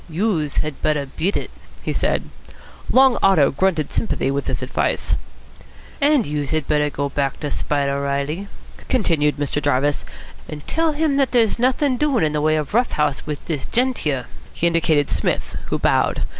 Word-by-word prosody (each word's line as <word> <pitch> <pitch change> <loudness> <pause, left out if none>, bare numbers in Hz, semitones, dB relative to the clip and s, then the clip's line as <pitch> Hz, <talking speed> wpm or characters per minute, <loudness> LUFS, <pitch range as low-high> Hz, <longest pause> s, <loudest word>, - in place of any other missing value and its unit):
"Youse 165 -4 -1
had 155 -2 -6
better 150 -2 +1
beat 165 +8 -2
it," - - -5 0.3
he - - -2
said. - - 0 0.7
Long 260 -1 +5
Otto 185 -8 +5
grunted 165 0 0
sympathy 215 -10 0
with 140 +1 -2
this - - -2
advice. - - -1 0.9
"And 285 -5 +4
youse 145 -2 -2
had 155 -2 -1
better 150 -1 +2
go 140 0 -2
back 140 -1 -2
to 150 - -3
Spider 140 -1 -1
Reilly," 140 +7 -2 0.4
continued 160 - +2
Mr. 145 0 -1
Jarvis, 145 +1 +1 0.5
"and 150 -1 -8
tell 325 -1 +1
him 295 -2 +1
that 275 -2 +1
there's 230 -2 +3
nothin' 255 +2 +2
doin' 280 - +2
in 155 -1 +1
the 150 - 0
way 155 +1 +3
of 150 +2 -3
rough 240 +2 +2
house 150 -1 0
wit 150 -2 -5
dis 150 -5 -3
gent 250 +1 +1
here." 135 -5 -1 0.3
He - - -2
indicated 160 -4 +2
Psmith, 90 - -1
who - - -1
bowed. - - +1
155 Hz, 175 wpm, -21 LUFS, 145-225 Hz, 0.9 s, Long